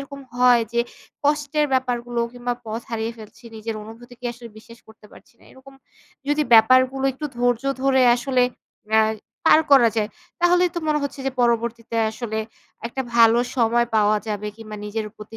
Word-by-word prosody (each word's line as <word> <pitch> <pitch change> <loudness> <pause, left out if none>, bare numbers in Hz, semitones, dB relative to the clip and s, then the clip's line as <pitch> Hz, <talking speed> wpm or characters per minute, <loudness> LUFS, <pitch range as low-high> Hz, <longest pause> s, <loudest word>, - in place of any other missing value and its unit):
এরকম 275 0 -9
হয় 245 -1 +5
যে 235 - +2 0.4
কষ্টের 295 0 +1
ব্যাপারগুলো 245 -2 -1
কিংবা 245 0 -3
পথ 220 +1 -4
হারিয়ে 230 0 -3
ফেলছি 215 +2 -14
নিজের 220 +1 -5
অনুভূতিকে 240 +3 -13
আসলে 235 0 -12
বিশ্বাস 230 +1 -15
করতে 220 -1 -17
পারছি - - -18
না। - - -23
এরকম 270 +1 -16 0.5
যদি 295 +1 +2
ব্যাপারগুলো 255 +4 +5
একটু 300 +4 -8
ধৈর্য 245 0 0 0.2
ধরে 265 -1 +3
আসলে 250 +1 +1 0.5
অ্যা 220 0 +5 0.4
পার 315 - +7
করা 245 -4 +7
যায় 210 -1 0 0.3
তাহলে 355 +1 +4
তো - - -1
মনে 300 -1 +2
হচ্ছে 280 -1 -5
যে - - +1
পরবর্তীতে 235 -1 0
আসলে 220 -1 -5 0.5
একটা 265 +3 -4
ভালো 230 0 +6 0.2
সময় 235 0 +2
পাওয়া 210 0 +3
যাবে 210 0 -3
কিংবা 215 -2 -9
নিজের 215 +1 -4
প্রতি 215 +1 -11
240 Hz, 165 wpm, -22 LUFS, 225-265 Hz, 0.5 s, পার